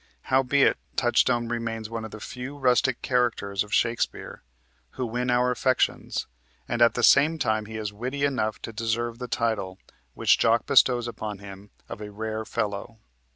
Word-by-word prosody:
Howbeit, 135 +1 +4 0.2
Touchstone 120 -1 +2
remains 115 -2 -3
one 115 0 -5
of - - -7
the 110 - -10
few 125 +6 -7
rustic 130 -1 +2
characters 115 -6 0
of 105 - -15
Shakespeare 115 0 -1 0.6
who 130 - -1
win 120 +2 -2
our 125 +1 +3
affections, 130 0 0 0.4
and 120 - -2
at 115 - +5
the 120 - -1
same 150 +6 +5
time 110 -6 0
he 110 0 -6
is 105 -1 -4
witty 130 +6 -4
enough 110 -6 -1
to 115 - -6
deserve 115 +2 -2
the 125 - -5
title 110 -6 -1 0.4
which - - +3
Jaques - - +3
bestows 120 -2 +4
upon 110 -3 -5
him 100 0 -11 0.2
of - - -8
a 105 - -6
"rare 110 +1 -4
fellow." 105 0 -3
115 Hz, 165 wpm, -26 LUFS, 110-125 Hz, 0.6 s, at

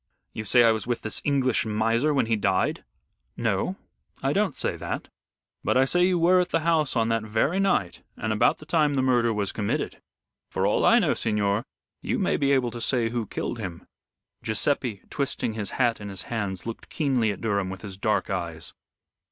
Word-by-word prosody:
You 110 - -5
say 120 +3 +5
I 115 - +6
was 110 +1 -2
with 120 -1 -1
this 110 - -2
English 135 -4 +2
miser 115 +6 +1
when 140 -5 +2
he 115 0 +1
died?" 95 -3 0 0.5
"No, - - 0 0.5
I - - +1
don't - - +1
say - - -2
that. - - -5 0.5
But - - +2
I 130 - +5
say 175 +6 +3
you 185 -1 +2
were 175 +2 +5
at 180 0 +1
the 165 - +1
house 155 -4 +2
on 115 -1 +2
that 115 0 +1
very 110 - 0
night, 195 - +1 0.2
and 110 0 -1
about 105 - +3
the 155 - -13
time 150 -2 +2
the 130 - +1
murder 120 -3 +3
was 105 -3 -1
committed. 100 -1 -2 0.5
For - - -1
all - - +2
I - - +6
know, - - +3
signor, 105 0 0 0.4
you - - -1
may - - +1
be 140 0 +1
able 130 -3 +2
to 120 - -7
say 120 -2 +1
who 115 -2 -3
killed 115 - -4
him." 90 -6 -6 0.6
Guiseppe, 115 -1 0
twisting 140 -5 -2
his 105 -3 -4
hat 120 -4 +2
in 105 - -6
his 95 -2 -6
hands, 100 -5 -4
looked 115 -1 -7
keenly 130 -9 +1
at 100 - -6
Durham 100 -4 0
with 95 -1 -8
his 100 -2 -7
dark 100 +1 0
eyes. 85 -3 -4
115 Hz, 200 wpm, -26 LUFS, 105-135 Hz, 0.6 s, I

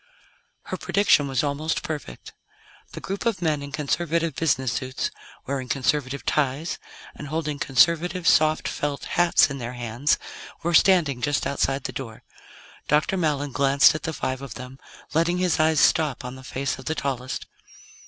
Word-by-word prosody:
Her - - -5
prediction 200 -8 +3
was 135 0 0
almost 150 +2 -1
perfect. 145 - -6 0.6
The - - -6
group 195 +1 -5
of 225 -5 0
men 155 -4 0
in 140 0 -7
conservative 165 +1 -1
business 130 -6 +1
suits, 130 0 -3 0.3
wearing 130 -2 -3
conservative 140 +1 -1
ties, 150 +3 0 0.3
and 145 - -8
holding 150 -1 -3
conservative, 170 +6 +2
soft, 155 0 +4
felt 145 -1 -3
hats 175 -4 +3
in 140 - -5
their 120 0 -5
hands 120 +4 0 0.5
were 170 +1 0
standing 160 -9 +4
just 145 0 0
outside 140 -1 0
the - - -4
door. 115 -5 -7 0.6
Dr. 150 +6 +2
Mallon 145 -5 0
glanced 135 +1 +5
at 155 - -4
the 160 - -3
five 130 -4 -3
of 135 -5 -8
them, 130 +1 -9 0.3
letting 170 +2 +2
his 180 -3 +1
eyes 155 -1 +3
stop 150 -5 +2
on 125 - -5
the 130 - -11
face 135 +1 -3
of 130 - -11
the 160 - -1
tallest. 130 -3 -3
145 Hz, 165 wpm, -24 LUFS, 130-160 Hz, 0.6 s, glanced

